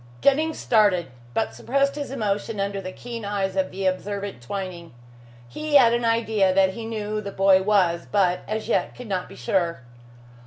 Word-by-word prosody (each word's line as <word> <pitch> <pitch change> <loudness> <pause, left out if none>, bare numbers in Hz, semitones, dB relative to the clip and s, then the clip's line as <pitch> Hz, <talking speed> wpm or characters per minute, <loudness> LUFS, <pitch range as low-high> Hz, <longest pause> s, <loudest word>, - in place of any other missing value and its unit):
Jennings 310 +3 +3
started, 200 - +2 0.2
but 110 - 0
suppressed 275 - 0
his 290 -1 -5
emotion 215 -3 -2
under 195 0 -2
the 185 0 -6
keen 235 +2 -7
eyes 200 -2 -2
of 190 -1 +1
the 190 +1 -5
observant 200 -3 -2
Twining. 175 0 -6 0.5
He 295 - -3
had 240 -4 +7
an 240 0 0
idea 220 -4 +2
that 190 -1 +4
he 225 +1 -6
knew 215 -2 -4
who 215 0 -2
the 200 -1 -6
boy 195 -1 +4
was, 190 -4 +2
but 180 -3 +2
as 215 +1 -3
yet - - 0
could 250 - -9
not 185 -3 -2
be - - -11
sure. 170 +4 -1
200 Hz, 185 wpm, -24 LUFS, 185-230 Hz, 0.5 s, had